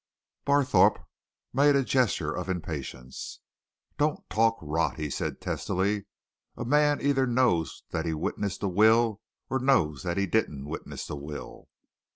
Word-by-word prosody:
Barthorpe 140 Hz, -2 st, +4 dB, 0.5 s
made 140 Hz, +2 st, +5 dB
a 140 Hz, -, +3 dB
gesture 110 Hz, -, +1 dB
of 90 Hz, 0 st, -4 dB
impatience. 75 Hz, -8 st, -5 dB, 0.6 s
"Don't 150 Hz, +1 st, 0 dB
talk 115 Hz, +1 st, +3 dB
rot!" 80 Hz, 0 st, -1 dB
he 75 Hz, -2 st, -3 dB
said -, -, -3 dB
testily. 100 Hz, +2 st, -1 dB, 0.5 s
"A 120 Hz, -, -4 dB
man 145 Hz, +3 st, +3 dB
either 135 Hz, -2 st, +2 dB
knows 120 Hz, -10 st, +1 dB
that 80 Hz, 0 st, -2 dB
he 80 Hz, -, 0 dB
witnessed 95 Hz, +6 st, -3 dB
a -, -, +2 dB
will 110 Hz, +3 st, +4 dB, 0.3 s
or 130 Hz, -, -1 dB
knows 80 Hz, -, +2 dB
that 85 Hz, +5 st, -2 dB
he 100 Hz, -, +2 dB
didn't 80 Hz, -9 st, -1 dB
witness 75 Hz, +3 st, -6 dB
a -, -, -3 dB
will." 75 Hz, +1 st, -8 dB
100 Hz, 145 wpm, -28 LUFS, 80-130 Hz, 0.6 s, made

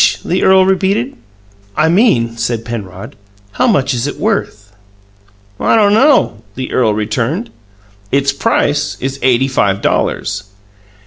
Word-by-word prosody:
the 180 Hz, -, 0 dB
earl 190 Hz, 0 st, +5 dB
repeated. 190 Hz, -8 st, 0 dB, 0.6 s
"I 155 Hz, -, +3 dB
mean," 160 Hz, -, +2 dB
said 115 Hz, -1 st, -3 dB
Penrod, 105 Hz, -3 st, -7 dB, 0.4 s
"how 255 Hz, -, 0 dB
much 140 Hz, -, +2 dB
is 120 Hz, +2 st, -2 dB
it 145 Hz, -, -6 dB
worth?" 105 Hz, -, -2 dB, 0.9 s
"I -, -, +2 dB
don't 205 Hz, -2 st, +4 dB
know," 260 Hz, -, +3 dB
the 130 Hz, 0 st, -5 dB
earl 110 Hz, -4 st, +1 dB
returned. 115 Hz, -, -2 dB, 0.6 s
"Its 140 Hz, 0 st, +1 dB
price 145 Hz, +1 st, 0 dB
is 135 Hz, +1 st, -4 dB
eighty 130 Hz, 0 st, +2 dB
five 100 Hz, -7 st, 0 dB
dollars." 105 Hz, -1 st, -1 dB
130 Hz, 130 wpm, -14 LUFS, 115-190 Hz, 0.9 s, earl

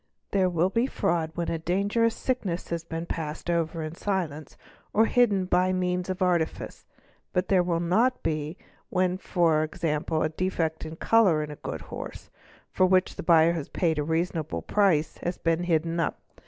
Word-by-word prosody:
| -, -, -48 dB
There 190 Hz, -2 st, +3 dB
will 175 Hz, +2 st, +1 dB
be 235 Hz, +4 st, +2 dB
fraud 170 Hz, -9 st, 0 dB
when 170 Hz, -1 st, -2 dB
a 165 Hz, -, -2 dB
dangerous 200 Hz, +7 st, +1 dB
sickness 205 Hz, -9 st, -2 dB
has 170 Hz, -1 st, -2 dB
been 165 Hz, 0 st, -5 dB
passed 160 Hz, 0 st, -4 dB
over 165 Hz, -1 st, -1 dB
in 155 Hz, 0 st, -5 dB
silence 170 Hz, -6 st, -3 dB, 0.4 s
or 220 Hz, +2 st, +5 dB
hidden 210 Hz, -6 st, +3 dB
by 185 Hz, +1 st, +2 dB
means 180 Hz, 0 st, -1 dB
of 185 Hz, 0 st, -1 dB
artifice, 175 Hz, -3 st, -1 dB, 0.5 s
but 180 Hz, +1 st, 0 dB
there 190 Hz, -2 st, +5 dB
will 175 Hz, -1 st, 0 dB
not 220 Hz, +10 st, +1 dB
be 155 Hz, +1 st, -2 dB, 0.3 s
when 185 Hz, 0 st, +1 dB
for 165 Hz, -5 st, +2 dB
example 155 Hz, -1 st, -1 dB
a 155 Hz, -, +1 dB
defect 160 Hz, -2 st, -2 dB
of 160 Hz, +1 st, -7 dB
colour 190 Hz, -10 st, +4 dB
in 150 Hz, -, -6 dB
a -, -, -7 dB
good -, -, -6 dB
horse, -, -, -8 dB, 0.4 s
for 185 Hz, -, +3 dB
which 185 Hz, 0 st, +2 dB
the -, -, -5 dB
buyer 165 Hz, -1 st, +5 dB
has 160 Hz, -4 st, -4 dB
paid 160 Hz, -4 st, 0 dB
a -, -, +1 dB
reasonable 160 Hz, 0 st, -2 dB
price, 185 Hz, -7 st, +2 dB
has 175 Hz, +1 st, -3 dB
been 165 Hz, +1 st, 0 dB
hidden 165 Hz, 0 st, 0 dB
up. 165 Hz, -, -1 dB
170 Hz, 180 wpm, -27 LUFS, 160-185 Hz, 0.5 s, or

